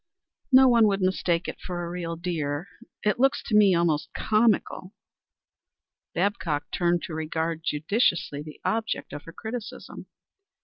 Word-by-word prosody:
"No 260 0 +8
one 235 -3 +5
would 200 -1 +1
mistake 185 -2 0
it - - -6
for 175 -2 -4
a - - -5
real 170 -1 -4
deer. 165 -2 -3 0.4
It 210 +2 +1
looks 270 +2 +2
to 215 - -1
me 200 -3 +6
almost 165 -3 +1
comical." 215 -3 +1 1.2
Babcock 160 -8 -1
turned 175 -2 +1
to 165 - -6
regard 160 +1 -2
judicially 160 -2 0
the 150 0 -10
object 225 0 -2
of 145 - -7
her 165 - -9
criticism. 220 +4 -7
175 Hz, 140 wpm, -26 LUFS, 160-210 Hz, 1.2 s, No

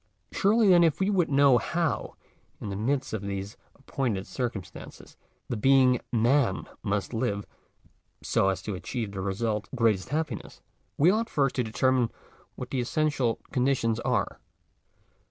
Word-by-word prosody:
Surely 210 +1 +3
then 175 -2 +7
ifjsa 170 +5 +2
would 180 -4 +2
know 140 -3 +5
hf>WjJn_thft 170 -2 -2 0.6
mirint 130 +6 -1
of 110 - -2
these 100 +1 -5 0.2
Appointed 125 -8 -3
circumstances*. 115 -8 -6 0.3
the_ 110 -3 -4
being 130 -1 +5
Man 120 -2 +2 0.2
mustjivftr 105 +1 -2 0.8
gft 95 - +2
m 95 - +1
to 105 - -4
achieve 105 +3 -4
the 100 -1 -5
result— 105 +2 -2
greatest 110 -6 +1
happiness, 150 -6 -4 0.4
we 155 +5 +5
flfight, 225 +4 +1
first 140 -3 +1
to 125 - +2
determine 125 +1 +1 0.5
what 125 - -7
the 130 - 0
essential 135 -2 0
con 125 -3 +1
di 140 0 +3
tions 115 -2 -1
are - - -1
125 Hz, 135 wpm, -27 LUFS, 105-140 Hz, 0.8 s, then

